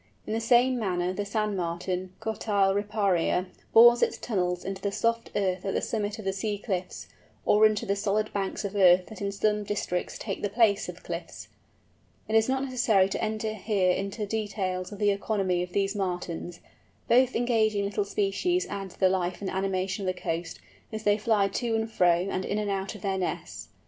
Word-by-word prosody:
In -, -, -3 dB
the 225 Hz, -, 0 dB
same 245 Hz, +2 st, +4 dB
manner 180 Hz, -3 st, -1 dB
the 205 Hz, +2 st, -3 dB
Sand 210 Hz, 0 st, -1 dB
Martin, 180 Hz, +1 st, -3 dB
Cotyle 210 Hz, -3 st, +1 dB
riparia, 200 Hz, -4 st, +1 dB, 0.3 s
bores 240 Hz, +1 st, +8 dB
its -, -, +1 dB
tunnels 180 Hz, -5 st, -2 dB
into 195 Hz, 0 st, -4 dB
the 200 Hz, -, -1 dB
soft 230 Hz, +2 st, 0 dB
earth 185 Hz, -2 st, 0 dB
at 195 Hz, -, -2 dB
the -, -, +2 dB
summit 210 Hz, -2 st, -2 dB
of 215 Hz, -, -9 dB
the 195 Hz, -, 0 dB
sea 205 Hz, +1 st, -2 dB
cliffs, 190 Hz, -3 st, -4 dB, 0.4 s
or 215 Hz, +1 st, +6 dB
into 215 Hz, +2 st, -2 dB
the 200 Hz, -2 st, 0 dB
solid 210 Hz, +1 st, -1 dB
banks 200 Hz, +1 st, -2 dB
of 200 Hz, +1 st, -4 dB
earth 185 Hz, -2 st, +6 dB
that 220 Hz, -3 st, -11 dB
in 200 Hz, 0 st, -1 dB
some 210 Hz, +1 st, 0 dB
districts 200 Hz, -3 st, -3 dB
take 195 Hz, -3 st, -5 dB
the 205 Hz, -, -1 dB
place 210 Hz, -1 st, +2 dB
of -, -, -9 dB
cliffs. -, -, -7 dB, 0.8 s
It 220 Hz, -, -4 dB
is 225 Hz, +2 st, +4 dB
not 265 Hz, 0 st, +1 dB
necessary 240 Hz, -7 st, +2 dB
to -, -, -3 dB
enter 215 Hz, 0 st, -2 dB
here 200 Hz, -3 st, +1 dB
into 200 Hz, +3 st, -2 dB
details 200 Hz, -4 st, -3 dB
of 205 Hz, -, -7 dB
the 205 Hz, 0 st, +3 dB
economy 195 Hz, -3 st, 0 dB
of 180 Hz, 0 st, -5 dB
these 200 Hz, +1 st, 0 dB
Martins. 175 Hz, -3 st, -4 dB, 0.5 s
Both 255 Hz, +1 st, +4 dB
engaging 220 Hz, -4 st, +2 dB
little 200 Hz, +1 st, -1 dB
species 210 Hz, -, 0 dB
add 195 Hz, -1 st, -4 dB
to -, -, -18 dB
the 190 Hz, -, +5 dB
life 185 Hz, -1 st, -1 dB
and 195 Hz, -, -4 dB
animation 190 Hz, 0 st, -1 dB
of 185 Hz, -, -2 dB
the -, -, -12 dB
coast, 165 Hz, 0 st, -3 dB, 0.3 s
as 220 Hz, -1 st, -5 dB
they 205 Hz, 0 st, +3 dB
fly 210 Hz, -2 st, +2 dB
to 230 Hz, +3 st, -1 dB
and 220 Hz, 0 st, 0 dB
fro 180 Hz, -4 st, +2 dB
and 190 Hz, -1 st, -2 dB
in 205 Hz, -, -2 dB
and 210 Hz, -1 st, -1 dB
out 195 Hz, +1 st, -3 dB
of 210 Hz, -, -11 dB
their 195 Hz, -1 st, -1 dB
nests. 180 Hz, -, -4 dB
200 Hz, 200 wpm, -27 LUFS, 190-215 Hz, 0.8 s, bores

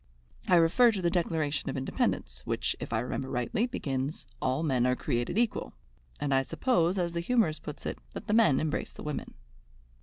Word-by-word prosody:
I 180 Hz, -, +5 dB
refer 175 Hz, +9 st, +6 dB
to 200 Hz, -, -2 dB
the 170 Hz, -, +2 dB
Declaration 160 Hz, -5 st, 0 dB
of 135 Hz, -, -3 dB
Independence, 65 Hz, -, -1 dB
which, -, -, -1 dB
if -, -, -6 dB
I 110 Hz, -1 st, +1 dB
remember 130 Hz, +2 st, -3 dB
rightly, 125 Hz, -, 0 dB
begins 140 Hz, -, -3 dB, 0.2 s
'All 130 Hz, +4 st, 0 dB
men 130 Hz, -5 st, +2 dB
are 125 Hz, -, +2 dB
created 120 Hz, -, -1 dB
equal,' 235 Hz, -1 st, 0 dB, 0.5 s
and 140 Hz, -1 st, 0 dB
I 135 Hz, -, +4 dB
suppose, 180 Hz, -, +1 dB
as 175 Hz, -2 st, 0 dB
the 170 Hz, -, -1 dB
humourist 170 Hz, -4 st, +1 dB
puts 150 Hz, -, -8 dB
it, -, -, -3 dB
that -, -, -7 dB
the 210 Hz, -, 0 dB
men 220 Hz, -12 st, +5 dB
embrace 155 Hz, -1 st, -2 dB
the -, -, -10 dB
women." 150 Hz, -2 st, -5 dB
155 Hz, 190 wpm, -29 LUFS, 130-180 Hz, 0.5 s, refer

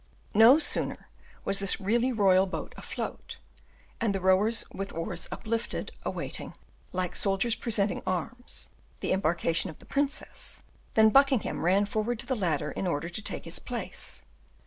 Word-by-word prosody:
No 225 Hz, +6 st, +8 dB
sooner 315 Hz, -, -1 dB, 0.4 s
was 195 Hz, 0 st, +2 dB
this 195 Hz, 0 st, +3 dB
really 235 Hz, +6 st, +1 dB
royal 195 Hz, -4 st, +4 dB
boat 185 Hz, -, -5 dB
afloat, -, -, -6 dB, 0.6 s
and 215 Hz, -4 st, +1 dB
the -, -, 0 dB
rowers 190 Hz, +5 st, +3 dB
with 195 Hz, +1 st, -4 dB
oars 165 Hz, +1 st, -4 dB
uplifted, 230 Hz, +1 st, -3 dB
awaiting, -, -, -5 dB, 0.4 s
like 180 Hz, -1 st, -2 dB
soldiers 195 Hz, +4 st, +2 dB
presenting 210 Hz, -4 st, +1 dB
arms, 185 Hz, +8 st, -4 dB, 0.3 s
the -, -, -1 dB
embarkation 170 Hz, 0 st, +1 dB
of 160 Hz, -, -10 dB
the -, -, -16 dB
princess, 285 Hz, +1 st, -2 dB, 0.3 s
than 220 Hz, 0 st, +6 dB
Buckingham 275 Hz, -1 st, +3 dB
ran 190 Hz, +4 st, +4 dB
forward 220 Hz, +3 st, -1 dB
to -, -, -5 dB
the 260 Hz, -, 0 dB
ladder 155 Hz, -8 st, 0 dB
in 190 Hz, -, -3 dB
order 170 Hz, 0 st, -1 dB
to 215 Hz, -, -6 dB
take -, -, -4 dB
his -, -, 0 dB
place. -, -, -3 dB
200 Hz, 150 wpm, -29 LUFS, 185-230 Hz, 0.6 s, No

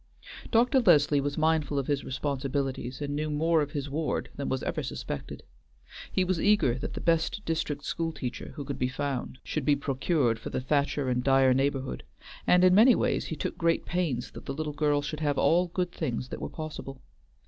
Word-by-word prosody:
Dr. 245 Hz, +3 st, +4 dB
Leslie 145 Hz, -, +4 dB
was 145 Hz, +1 st, -3 dB
mindful 155 Hz, -2 st, +1 dB
of 135 Hz, -, 0 dB
his 140 Hz, 0 st, -1 dB
responsibilities, 135 Hz, -1 st, -3 dB
and 145 Hz, 0 st, -3 dB
knew 155 Hz, +1 st, -1 dB
more 160 Hz, +2 st, +2 dB
of 145 Hz, 0 st, -3 dB
his 145 Hz, -1 st, -3 dB
ward 150 Hz, +3 st, -2 dB
than 140 Hz, -, -3 dB
was 130 Hz, -, -1 dB
ever -, -, -2 dB
suspected. -, -, -6 dB, 0.7 s
He 185 Hz, -, +2 dB
was 185 Hz, -2 st, 0 dB
eager 205 Hz, -, +4 dB
that -, -, -5 dB
the -, -, -3 dB
best 165 Hz, +4 st, +1 dB
district 155 Hz, -3 st, -2 dB
school 165 Hz, 0 st, -2 dB
teacher 125 Hz, -5 st, -6 dB
who 145 Hz, -3 st, -6 dB
could 140 Hz, -1 st, -5 dB
be 125 Hz, -, +1 dB
found 130 Hz, -1 st, -3 dB
should 155 Hz, -, -3 dB
be 145 Hz, +2 st, +4 dB
procured 135 Hz, -3 st, 0 dB
for -, -, -6 dB
the -, -, -2 dB
Thacher 140 Hz, +1 st, 0 dB
and 125 Hz, -1 st, 0 dB
Dyer 135 Hz, -1 st, +5 dB
neighborhood, 135 Hz, 0 st, -1 dB, 0.4 s
and 180 Hz, 0 st, +5 dB
in 185 Hz, 0 st, +6 dB
many 230 Hz, +6 st, +7 dB
ways -, -, 0 dB
he -, -, -4 dB
took -, -, -4 dB, 0.3 s
pains 155 Hz, -9 st, -1 dB
that -, -, -11 dB
the 135 Hz, -, -3 dB
little 155 Hz, 0 st, -3 dB
girl 145 Hz, 0 st, +1 dB
should 155 Hz, +1 st, -4 dB
have 145 Hz, -2 st, 0 dB
all 175 Hz, +2 st, +3 dB
good 180 Hz, 0 st, -2 dB
things 125 Hz, -3 st, -3 dB
that -, -, -6 dB
were -, -, -4 dB
possible. 150 Hz, -4 st, -7 dB
145 Hz, 200 wpm, -28 LUFS, 135-160 Hz, 0.7 s, many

